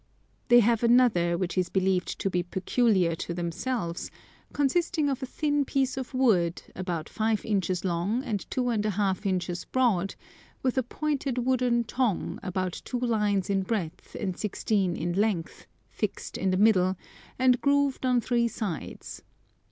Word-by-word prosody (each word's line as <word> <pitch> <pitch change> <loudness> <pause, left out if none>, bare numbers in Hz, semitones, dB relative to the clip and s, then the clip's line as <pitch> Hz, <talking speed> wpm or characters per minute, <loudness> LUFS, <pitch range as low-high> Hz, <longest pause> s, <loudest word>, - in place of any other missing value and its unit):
They 240 0 +7
have 230 0 +2
another, 230 -8 +4
which 180 0 -2
is 180 - 0
believed 190 -1 0
to 195 - +1
be 180 - +1
peculiar 190 0 +1
to 170 - -4
themselves, 175 +2 -3 0.4
consisting 305 +2 +1
of 270 -1 -2
a 260 - -3
thin 290 +1 0
piece 270 -1 0
of 265 -1 -5
wood, 185 -10 +2
about 175 -4 -3
five 220 -1 -1
inches 190 -4 0
long 185 +8 0
and 215 -7 -3
two 250 -1 0
and 220 -3 0
a 215 - 0
half 200 0 0
inches 180 -1 -1
broad, 205 -8 +1 0.5
with 255 -2 +1
a - - +3
pointed 275 0 -2
wooden 250 -2 +2
tongue, 235 -4 -1
about 185 -1 -3
two 250 - -3
lines 210 -5 +1
in 195 -1 +1
breadth 190 -5 -4
and 190 -4 -2
sixteen 200 -3 0
in 175 - -2
length, 195 -4 -1 0.2
fixed - - -4
in 190 - 0
the 185 - +1
middle, 190 -3 +4 0.4
and 255 -1 +3
grooved 280 -1 +2
on 250 -2 +3
three 235 0 +1
sides. 200 - -5
210 Hz, 160 wpm, -27 LUFS, 185-250 Hz, 0.5 s, They